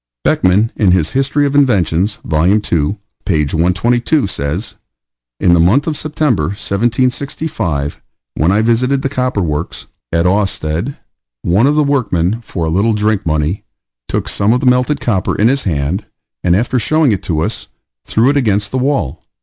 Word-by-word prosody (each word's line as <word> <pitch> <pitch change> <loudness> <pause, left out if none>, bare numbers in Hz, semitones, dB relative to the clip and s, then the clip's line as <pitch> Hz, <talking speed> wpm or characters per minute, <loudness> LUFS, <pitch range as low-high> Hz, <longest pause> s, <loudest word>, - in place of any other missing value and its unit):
Beckmann, 100 +5 +2
in 105 -4 +2
his 85 -4 +1
History 140 +2 +1
of 140 - -1
Inventions, 105 - +2
Vol. 80 +2 +1
II., 90 -3 0 0.3
page 75 -6 0
122, 120 - +1
says: 85 +2 -3 0.7
In 90 -3 +4
the 85 - +4
month 105 - +3
of 160 - -2
September, 150 -6 0
1765, 120 - -2 0.3
when 80 +4 +1
I 105 +3 +2
visited 125 +4 +1
the 135 - 0
copper 125 -7 -1
works 75 0 -3 0.3
at 85 +1 +1
Awested, 95 - -1 0.5
one 100 +9 +3
of 145 - +2
the 150 - +3
workmen, 115 - 0
for 85 -7 -4
a - - -1
little 100 +7 +2
drink 105 -3 0
money, 80 +4 -1 0.4
took - - -2
some 105 +3 +1
of 125 - +1
the 135 - -3
melted 125 +3 +2
copper 95 -7 -1
in 110 +3 +3
his 135 +1 0
hand, 80 +3 -2 0.4
and 90 -1 +3
after 120 +5 +1
showing 155 +1 +2
it 100 - -1
to 80 -3 -2
us, - - -3 0.4
threw 120 +5 +2
it 145 - 0
against 105 -5 +1
the 130 - -1
wall. 105 - -1
105 Hz, 165 wpm, -15 LUFS, 85-130 Hz, 0.7 s, In